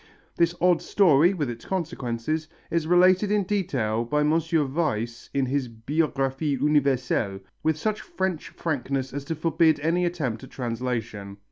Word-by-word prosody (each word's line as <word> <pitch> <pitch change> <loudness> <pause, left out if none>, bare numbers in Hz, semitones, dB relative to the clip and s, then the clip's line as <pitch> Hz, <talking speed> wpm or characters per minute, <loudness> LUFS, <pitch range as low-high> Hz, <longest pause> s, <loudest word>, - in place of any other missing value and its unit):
This 170 0 +2
odd 175 -2 +3
story, 170 -3 +4
with 150 -6 -1
its 120 -1 -6
consequences, 155 -4 -3 0.2
is 165 -2 0
related 185 +3 +5
in 210 -1 +2
detail 130 - -1
by 150 +5 0
M. 150 +1 +3 0.2
Weiss 135 -7 -1
in 135 -1 +1
his 130 -1 -1
Biographie 135 +3 -1
Universelle, 130 -8 +1 0.2
with 160 -1 +1
such 215 +6 -1
French 190 -4 -3
frankness 135 -4 -3
as 140 0 -4
to 165 - -3
forbid 160 0 +2
any 170 +3 +1
attempt 140 -10 -2
at 130 - -10
translation. 115 -5 -4
150 Hz, 145 wpm, -25 LUFS, 125-170 Hz, 0.2 s, related